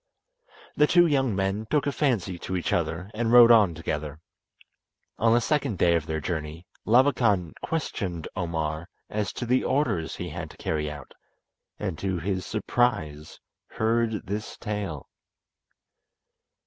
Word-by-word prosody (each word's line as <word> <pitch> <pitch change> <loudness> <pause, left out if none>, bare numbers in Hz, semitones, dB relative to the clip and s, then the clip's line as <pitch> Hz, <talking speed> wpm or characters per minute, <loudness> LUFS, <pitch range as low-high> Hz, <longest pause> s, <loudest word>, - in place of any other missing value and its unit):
The 150 - +4
two 175 +1 +5
young 135 - +1
men 95 +3 -1
took 150 -2 +1
a 145 - +1
fancy 110 - 0
to 95 - -4
each 85 - -2
other 90 +5 -2
and 115 +1 -1
rode 120 -1 +9
on 105 -8 +5
together. 75 -2 -4 1.0
On 115 0 +4
the 120 - +5
second 135 -4 0
day 85 0 +4
of 80 -1 -1
their 80 -1 -2
journey 80 +1 -4 0.2
Labakan 115 - +3
questioned 95 - -3
Omar 80 -2 -3 0.2
as 105 -2 -1
to 120 - -4
the 125 +2 +2
orders 130 - 0
he 90 - -5
had 80 0 -6
to - - -15
carry 75 -1 -2
out, 75 -3 -10 0.6
and 95 -7 -4
to 95 -2 -1
his 95 +2 -3
surprise 100 -9 -1 0.3
heard 110 -1 0
this 105 +3 -5
tale. 105 - -4
95 Hz, 145 wpm, -26 LUFS, 80-115 Hz, 1.0 s, rode